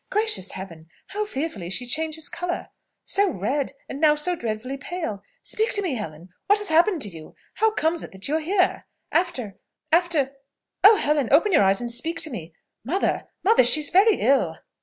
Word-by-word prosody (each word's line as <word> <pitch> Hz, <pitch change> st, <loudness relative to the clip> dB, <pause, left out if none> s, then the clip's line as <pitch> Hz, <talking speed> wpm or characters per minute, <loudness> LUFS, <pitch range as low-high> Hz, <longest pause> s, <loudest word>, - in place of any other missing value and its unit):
Gracious 425 Hz, -, +2 dB
Heaven, 165 Hz, -4 st, -9 dB, 0.2 s
how 425 Hz, +1 st, -2 dB
fearfully 265 Hz, -, -4 dB
she 245 Hz, +6 st, 0 dB
changes 315 Hz, +4 st, -1 dB
colour! 350 Hz, +1 st, -4 dB, 0.3 s
So 400 Hz, 0 st, +1 dB
red, 270 Hz, -, -2 dB
and 275 Hz, -, -7 dB
now 300 Hz, -1 st, +5 dB
so 350 Hz, +4 st, -1 dB
deadly 235 Hz, -1 st, -4 dB
pale! 275 Hz, -, -5 dB, 0.2 s
Speak 440 Hz, +3 st, -1 dB
to 410 Hz, -, +1 dB
me, 350 Hz, -7 st, -1 dB
Helen 175 Hz, -6 st, -7 dB, 0.2 s
What 410 Hz, +2 st, +5 dB
has 415 Hz, -1 st, -1 dB
happened 335 Hz, 0 st, +3 dB
to -, -, -2 dB
you? 160 Hz, -4 st, -12 dB, 0.2 s
How 445 Hz, -, +4 dB
comes 335 Hz, -6 st, 0 dB
it -, -, -9 dB
that 190 Hz, +1 st, -5 dB
you 305 Hz, +3 st, +1 dB
are -, -, -1 dB
here? 365 Hz, +3 st, 0 dB, 0.2 s
After 265 Hz, -, -1 dB, 1.3 s
Oh, 420 Hz, +3 st, +9 dB
Helen, 295 Hz, -, +1 dB
open 330 Hz, +9 st, +4 dB
your -, -, +5 dB
eyes, 195 Hz, +1 st, +3 dB
and 240 Hz, -1 st, -2 dB
speak 325 Hz, +8 st, -1 dB
to 310 Hz, -, -4 dB
me! 170 Hz, -8 st, -8 dB, 0.3 s
Mother! 345 Hz, -, -1 dB, 0.2 s
mother! 430 Hz, -, +5 dB
she 245 Hz, +6 st, +6 dB
is 295 Hz, -, +1 dB
very 405 Hz, +3 st, +5 dB
ill!" 230 Hz, -, +1 dB
300 Hz, 185 wpm, -24 LUFS, 215-360 Hz, 1.3 s, Oh